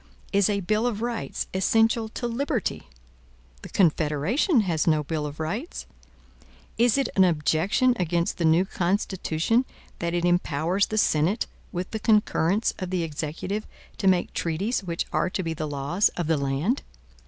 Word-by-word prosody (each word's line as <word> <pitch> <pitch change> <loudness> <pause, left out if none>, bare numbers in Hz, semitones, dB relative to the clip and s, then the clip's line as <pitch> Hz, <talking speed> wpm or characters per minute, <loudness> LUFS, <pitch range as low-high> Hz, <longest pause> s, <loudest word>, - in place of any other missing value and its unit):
Is 200 0 +4
a 200 -1 0
bill 215 +5 +1
of 225 -2 -2
rights 235 -1 -3
essential 225 +4 +2
to 240 - -5
liberty? 240 - -2 0.7
The - - -9
Confederation 175 - +2
has 170 -6 0
no 155 -2 +3
bill 150 0 -2
of 145 +1 -9
rights. 210 - -4 0.9
Is 240 +2 +3
it 275 - +1
an 190 - +6
objection 175 - +2
against 170 0 0
the 170 - +1
new 165 +4 +4
Constitution, 190 +2 0 0.4
that 170 0 -1
it 175 0 0
empowers 175 +2 +1
the 215 - -3
Senate, 175 +2 +2 0.3
with 180 +1 -4
the 220 - -3
concurrence 210 -2 +2
of 185 - -4
the 180 -2 -1
Executive, 165 +7 -4 0.3
to 195 - +1
make 185 -2 +2
treaties 195 +8 -1
which 170 -2 -2
are - - +1
to 185 - -3
be 165 -1 -2
the 155 -1 -4
laws 145 +8 +1
of 175 - -1
the 160 +1 +2
land? 140 - 0
185 Hz, 160 wpm, -25 LUFS, 160-215 Hz, 0.9 s, an